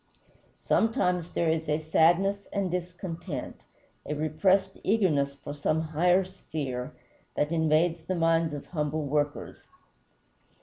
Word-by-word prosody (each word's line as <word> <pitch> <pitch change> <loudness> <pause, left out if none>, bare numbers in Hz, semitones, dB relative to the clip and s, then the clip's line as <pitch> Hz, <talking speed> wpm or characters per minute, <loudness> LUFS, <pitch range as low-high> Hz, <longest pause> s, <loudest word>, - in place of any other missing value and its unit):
Sometimes 180 -6 +1
there 170 - +1
is 160 -1 -2
a 150 - +2
sadness 175 +6 +2
and 195 -3 -1
discontent, 175 -4 -5 0.4
a 150 - -4
repressed 185 +6 +1
eagerness 155 -10 +2
for 145 - -8
some 150 +2 0
higher 175 +4 +2
sphere, 140 -7 -5 0.4
that 150 +2 0
invades 160 +1 +2
the 185 - -1
minds 165 -2 +2
of 145 - -7
humble 150 -2 -2
workers. 145 +1 -2
165 Hz, 120 wpm, -28 LUFS, 150-180 Hz, 0.4 s, a